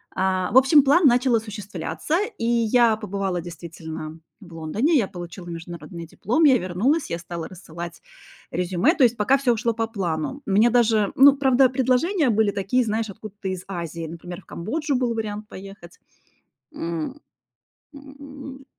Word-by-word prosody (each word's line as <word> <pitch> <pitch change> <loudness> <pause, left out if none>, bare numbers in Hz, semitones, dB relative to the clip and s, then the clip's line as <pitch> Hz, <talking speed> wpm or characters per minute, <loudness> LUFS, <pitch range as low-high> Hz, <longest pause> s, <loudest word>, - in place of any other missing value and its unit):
А, 185 0 0
в - - +4
общем, 270 +2 +7
план 290 +4 +5
начал 250 0 +3
осуществляться, 205 - -3 0.2
и 230 - -3
я 235 -1 +3
побывала 195 -4 -3
действительно 160 -2 -8 0.2
в 175 -4 -13
Лондоне. 205 - 0
Я 230 -9 +3
получила 175 -1 -9
международный 170 -1 -8
диплом. 240 - -1
Я 270 -4 +6
вернулась, 215 - 0
я 170 - -2
стала 170 -1 -6
рассылать 170 -2 -9 0.5
резюме, 180 - +1
то 290 - +3
есть 235 -1 +3
пока 260 +6 +3
всё 250 -3 +2
ушло 230 +1 -1
по 225 0 -2
плану. 195 - -3
Мне 210 +4 +4
даже 220 -4 +3
ну, 275 +1 +7
правда, 265 -1 +4
предложения 260 +6 +1
были 220 -2 +2
такие, 200 +6 0
знаешь, 220 -1 -2
откуда-то 205 0 -9
из 185 -1 -4
Азии, 170 -3 -5
например, 175 +3 -8
в - - -35
Камбоджу 285 - -3
был 245 -2 0
вариант 210 -1 -4
поехать. 195 -3 -12 0.7
М, 170 - -4 0.7
м. 280 -1 -11
215 Hz, 155 wpm, -23 LUFS, 175-255 Hz, 0.7 s, общем